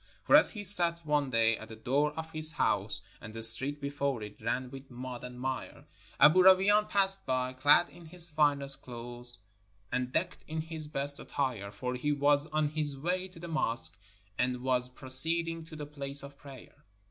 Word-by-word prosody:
For - - +4
as - - +8
he 210 -3 -5
sat 170 -4 +7
one 150 -2 0
day 115 -2 +1
at 110 - -11
the 110 - -11
door 140 +7 -1
of 160 +1 -8
his 155 0 0
house 100 -4 -1 0.2
and 110 -1 -11
the 115 - -2
street 130 +6 +5
before 140 -4 -4
it 105 0 -12
ran 125 +3 -3
with 135 0 -12
mud 125 -1 -9
and 125 0 -10
mire, 130 0 -6 0.3
Aboo 175 +5 +6
Rawain 195 +3 +4
passed 195 -1 -1
by, 130 0 -2
clad 145 +6 +3
in 170 -2 -16
his 170 +1 +3
finest 145 -3 -1
clothes 120 -2 -5 0.5
and 125 0 -3
decked - - -3
in 160 0 -4
his 160 -1 -7
best 140 -1 +1
attire, 125 -8 -4
for 125 +5 -6
he 135 +4 -3
was 145 +1 +1
on 155 -2 -1
his 150 -2 -4
v/ay 180 +6 -3
to 180 -2 -16
the 170 - -9
mosque, 120 -9 +1 0.4
and 125 0 -2
was 125 -1 0
proceeding 165 +6 +1
to 160 - -12
the 150 -1 -7
place 140 -1 +2
of 140 0 -11
prayer. 140 +1 -15
140 Hz, 190 wpm, -29 LUFS, 125-155 Hz, 0.5 s, as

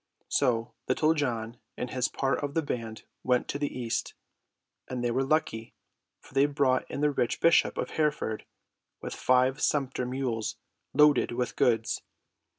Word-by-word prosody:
So 115 0 +1
Little 155 +1 +3
John 120 -6 -2 0.2
and 125 - -4
his 130 -1 +1
part 135 -1 -1
of 145 0 -3
the 165 - +2
band 115 -5 -4 0.2
went 125 -1 +2
to 140 - -2
the 145 -1 -1
east; 120 -2 -2 0.7
and 125 -1 -4
they 120 - +1
were 130 +3 +1
lucky, 135 -6 -1 0.4
for - - -19
they 135 +2 +4
brought 140 -3 +1
in - - -4
the 150 0 +3
rich 120 -4 0
bishop 165 0 +4
of - - -2
Hereford 145 -8 -1 0.5
with - - -6
five 130 +1 +2
sumpter 130 -3 0
mules 125 -4 -2 0.3
loaded 150 -3 +4
with 125 0 -2
goods. 115 -1 +1
130 Hz, 155 wpm, -28 LUFS, 120-145 Hz, 0.7 s, they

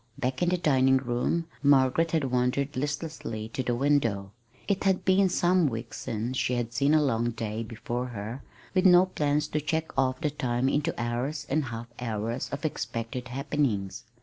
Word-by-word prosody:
Back 130 +3 -2
in 175 - +3
the 180 - +2
dining 135 -5 +4
room 130 +6 -1 0.2
Margaret 140 +3 +4
had 160 -2 +1
wandered 125 +3 0
listlessly 145 -6 -4
to 130 - -3
the 125 -1 0
window. 120 -8 +1 0.4
It 200 -2 0
had 190 -2 +1
been 190 0 +4
some 175 -1 +3
weeks 115 -2 -5
since 115 +4 -3
she 125 - +1
had 120 -1 -2
seen 145 +2 +3
a 155 - +4
long 120 -3 +1
day 110 -1 -4
before 120 +2 -4
her 115 +2 -6 0.3
with 185 -1 +5
no 180 0 +7
plans 150 -5 0
to 150 - -1
check 160 +2 -2
off 130 -1 +1
the 150 -3 0
time 125 -3 0
into 150 +3 0
hours 125 +6 -2
and 150 0 +1
half 115 -1 -5
hours 115 0 -3
of - - -5
expected 125 -3 -3
happenings. 130 -7 -1
130 Hz, 175 wpm, -28 LUFS, 120-150 Hz, 0.4 s, no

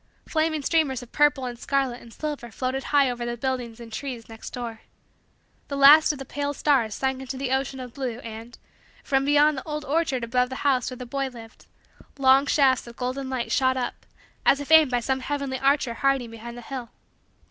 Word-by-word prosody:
Flaming 315 -2 0
streamers 275 -6 +1
of 245 - -15
purple 295 -2 +3
and 240 -1 -6
scarlet 270 -3 -1
and 230 - -14
silver 295 -3 -5
floated 255 +4 -3
high 285 -2 +4
over 245 -1 -3
the 240 0 -3
buildings 245 -2 -3
and 230 -1 -10
trees 250 -3 -5
next 225 -1 -9
door. 235 -3 -6 0.9
The 280 - -4
last 290 +3 +8
of 295 - -7
the 270 - -7
pale 285 +2 -3
stars 255 -9 +2
sank 265 0 -1
into 265 0 -6
the 265 -1 -3
ocean 265 0 -1
of 250 -2 -8
blue 255 -5 -4
and, 225 +1 -9 0.5
from 270 -1 +1
behind 290 0 +4
the - - -11
old 300 -2 -5
orchard 285 -4 0
above 250 +2 +1
the 260 - -5
house 260 -3 +2
where 255 - -8
the 250 - -7
boy 275 +2 -2
lived, 230 -3 -13 0.5
long 270 +1 +5
shafts 270 -4 +3
of 235 - -11
golden 260 +2 -3
light 255 -2 -3
shot 260 -1 +2
up 245 -1 -4 0.4
as 275 - +4
if 285 +2 -6
aimed 315 -3 +8
by 245 -1 0
some 265 +2 -1
heavenly 275 -1 -3
archer 270 -2 +2
hiding 265 -1 0
behind 235 +1 -9
the - - -8
hill. 250 -2 -6
265 Hz, 205 wpm, -25 LUFS, 240-280 Hz, 0.9 s, last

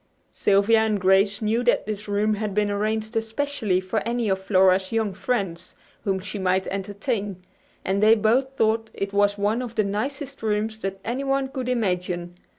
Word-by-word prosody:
Sylvia 205 +3 +3
and 220 -2 +1
Grace 195 +3 +3
knew 225 +3 +1
that 240 - +3
this 210 0 -5
room 205 +1 +1
had 210 -1 -3
been 210 -1 +1
arranged 215 +2 -2
especially 225 -3 -1
for 185 +4 -2
any 235 -1 -1
of 190 0 +1
Flora's 190 -1 +3
young 220 -3 0
friends 190 -5 -3 0.3
whom 195 -2 +1
she 200 +2 -6
might 190 0 +1
entertain, 200 -1 -3 0.4
and 195 +1 0
they 215 +1 +7
both 255 +5 +1
thought 225 0 +1
it 200 0 -3
was 205 0 +2
one 210 +4 0
of 240 -2 -6
the 215 - +2
nicest 265 +8 -3
rooms 220 0 -1
that 195 -2 -4
anyone 270 +2 -1
could 260 -2 -4
imagine. 180 -6 -1
210 Hz, 170 wpm, -24 LUFS, 195-225 Hz, 0.4 s, they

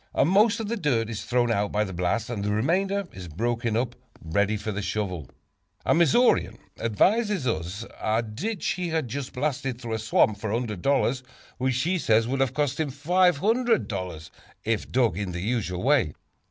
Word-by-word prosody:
Most 205 +7 +4
of 220 - -3
the 235 +2 -2
dirt 120 - 0
is 110 -3 -4
thrown 120 -1 +2
out 105 -2 0
by 105 +1 +1
the 95 -2 -5
blast 90 +7 -1
and 105 -4 -3
the 105 - -1
remainder 190 - +1
is 90 -2 -8
broken 115 +6 -1
up 120 0 -1 0.2
ready 100 +6 0
for 105 +1 -4
the 105 0 -3
shovel. 90 -6 -3 0.6
A - - +4
Missourian 170 - +3 0.2
advises 200 - +2
us 95 -1 -2
of - - -13
a 110 +2 +1
ditch 170 - -4
he 180 -1 -1
has 160 -1 0
just 130 +2 -5
blasted 135 -2 -2
through 120 -3 -5
a 110 - -1
swamp 110 -1 +2
for 110 - -3
$100, 120 +4 0 0.4
which 130 0 +1
he 180 +2 +1
says 115 -4 +3
would 135 +2 -1
have 130 -2 +1
cost 145 -2 0
him 155 -2 0
$500 170 - +1 0.3
if 110 -1 -1
dug 115 -8 +2
in 95 -3 -3
the 85 - -4
usual 100 -4 -2
way. 130 - +3
120 Hz, 180 wpm, -26 LUFS, 105-150 Hz, 0.6 s, Most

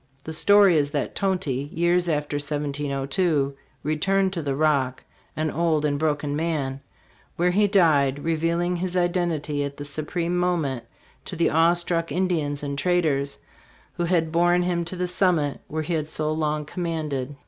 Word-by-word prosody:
The 160 - -6
story 200 +1 +5
is 145 -1 +1
that 145 -1 -2
Tonty, 155 -9 -1
years 175 +1 +1
after 150 -1 -1
1702, 145 +1 -1 0.3
returned 190 +6 +1
to 170 - -3
the 140 -3 -2
Rock, 140 -4 +1 0.3
an 155 0 -1
old 160 -2 +1
and 145 -1 0
broken 150 -2 -1
man, 145 -4 -2 0.5
where 180 +1 +2
he 205 +3 +3
died, 145 -8 +3
revealing 170 +2 0
his 180 +1 -2
identity 170 -5 0
at 140 0 -5
the 145 - -6
supreme 165 +4 -2
moment 165 -9 0 0.4
to 185 - -6
the 170 - +2
awe 165 +2 +4
struck 170 -2 -1
Ind 185 +4 0
ians 145 -4 -1
and 140 -1 -3
traders 150 -6 +1 0.6
who 175 - -2
had 165 -2 +1
borne 175 +1 +3
him 175 -1 0
to 170 - -5
the 180 0 -1
summit 175 -5 +1
where 155 +1 -3
he 170 - -3
had 155 -2 -1
so 155 0 -1
long 155 -1 -1
commanded. 150 -5 -3
160 Hz, 165 wpm, -24 LUFS, 145-175 Hz, 0.6 s, story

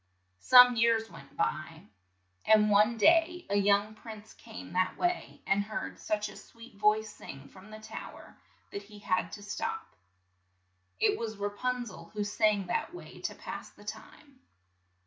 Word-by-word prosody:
Some 250 -1 +8
years 225 -1 +2
went - - -14
by, - - -2 0.6
and 215 -1 +5
one 210 +3 +4
day 335 - +4
a - - +2
young 205 +1 +3
prince 220 -1 -11
came 90 +1 -11
that 185 0 0
way, 355 0 -2
and 200 +1 +2
heard 215 +1 -6
such 210 0 -2
a - - -11
sweet 230 0 -14
voice 210 +1 +2
sing 135 0 -11
from 190 +5 -15
the 215 0 -10
tow 220 0 -9
er - - -15 0.4
that 200 - -5
he 210 +1 -14
had 185 -4 -1
to 205 - -8
stop. 445 - -4 1.1
It - - +2
was 220 -2 -4
Ra 205 0 -2
pun 250 +4 -2
zel, 185 -6 -10
who 210 - -1
sang 205 -1 +1
that 255 - -2
way - - -11
to - - -4
pass - - -8
the - - -18
time. 285 -4 -10
215 Hz, 165 wpm, -30 LUFS, 205-235 Hz, 1.1 s, Some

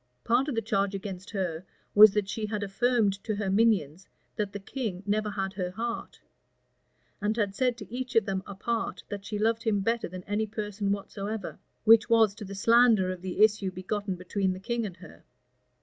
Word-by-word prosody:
Part 245 +4 +2
of 285 - -2
the 225 - -1
charge 200 -1 0
against 190 -1 -6
her 180 -5 -3 0.3
was 210 0 +9
that 210 -2 +1
she 215 +1 -3
had 210 -1 -3
affirmed 205 -1 +1
to 215 - -2
her 200 -2 -2
minions, 190 -6 +2 0.3
that 205 -2 -2
the 205 - -6
king 200 -3 -4
never 210 +1 0
had 195 -2 -3
her 185 -3 -3
heart; 230 +5 -5 1.0
and 215 +2 0
had 205 -3 0
said 250 +2 0
to 235 - -10
each 255 0 -4
of 225 -3 +4
them 190 -1 -2
apart, 225 +4 -3
that 200 -1 -5
she 210 - -3
loved 225 +2 +1
him 215 -4 +1
better 230 +3 0
than 180 +1 -8
any 210 +3 -1
person 210 -1 -3
whatsoever; 200 0 -4 0.2
"which 225 +1 +6
was 225 -3 +5
to 210 - -9
the 195 +1 -7
slander 225 -3 +4
of 185 -1 -7
the 190 +2 +1
issue 210 -2 +3
begotten 190 +2 -3
between 185 +1 -1
the 185 - -7
king 230 +2 -2
and 185 -2 -10
her." 85 - -14
205 Hz, 195 wpm, -28 LUFS, 195-225 Hz, 1.0 s, was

